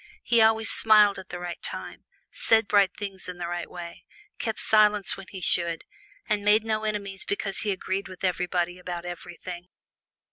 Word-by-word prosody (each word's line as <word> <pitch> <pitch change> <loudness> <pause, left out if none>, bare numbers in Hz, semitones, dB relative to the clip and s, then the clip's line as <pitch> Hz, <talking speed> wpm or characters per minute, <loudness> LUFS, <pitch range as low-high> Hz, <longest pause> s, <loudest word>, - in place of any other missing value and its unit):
He 235 -1 +3
always 220 0 +4
smiled 210 -3 +5
at 190 - -12
the 180 - -6
right 175 -1 -6
time, - - -7 0.3
said 225 -2 +2
bright 195 -1 +3
things 195 -3 -6
in 180 - -7
the 175 - -4
right 175 0 -4
way, 175 -1 -9 0.4
kept 220 -2 -3
silence 210 -2 +4
when 195 -1 -11
he 190 -2 -8
should, 170 0 +1 0.4
and 210 -2 0
made 210 +1 +4
no 215 -1 -1
enemies 200 -2 -3
because 200 -1 -3
he 210 - -2
agreed 190 0 -2
with 185 0 -12
everybody 180 0 -1
about 175 -1 -6
everything. 175 0 -8
190 Hz, 175 wpm, -26 LUFS, 175-210 Hz, 0.4 s, smiled